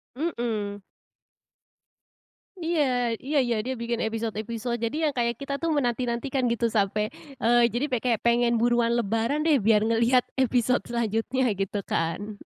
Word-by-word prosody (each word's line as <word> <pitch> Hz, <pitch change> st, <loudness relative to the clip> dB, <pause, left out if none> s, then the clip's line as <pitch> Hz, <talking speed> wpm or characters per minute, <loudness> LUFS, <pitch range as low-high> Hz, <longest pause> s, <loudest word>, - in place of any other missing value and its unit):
Mhm. 225 Hz, -9 st, -3 dB, 1.8 s
Iya 330 Hz, -1 st, +1 dB, 0.4 s
iya 290 Hz, +2 st, 0 dB
iya 235 Hz, -2 st, 0 dB
dia 260 Hz, -, -2 dB
bikin 235 Hz, 0 st, -1 dB
episode-episode 225 Hz, +1 st, -3 dB
jadi 230 Hz, +6 st, -3 dB
yang -, -, -5 dB
kayak 235 Hz, 0 st, +1 dB
kita 280 Hz, 0 st, -4 dB
tuh 330 Hz, -1 st, +1 dB
menanti-nantikan 250 Hz, 0 st, -1 dB
gitu 235 Hz, 0 st, 0 dB
sampai, 210 Hz, +2 st, +1 dB, 0.3 s
eee, 240 Hz, +1 st, +4 dB
jadi 245 Hz, +4 st, 0 dB
pe 250 Hz, -, +2 dB
kayak 235 Hz, -4 st, +1 dB
pengen 235 Hz, 0 st, +3 dB
buruan 240 Hz, 0 st, +2 dB
lebaran 230 Hz, +6 st, 0 dB
deh 310 Hz, -3 st, +5 dB
biar 215 Hz, -2 st, +3 dB
ngelihat 235 Hz, +2 st, +4 dB, 0.2 s
episode 250 Hz, -3 st, +1 dB
selanjutnya 235 Hz, +2 st, 0 dB
gitu 195 Hz, +1 st, -2 dB
kan. 195 Hz, +6 st, -3 dB
235 Hz, 140 wpm, -26 LUFS, 220-250 Hz, 1.8 s, deh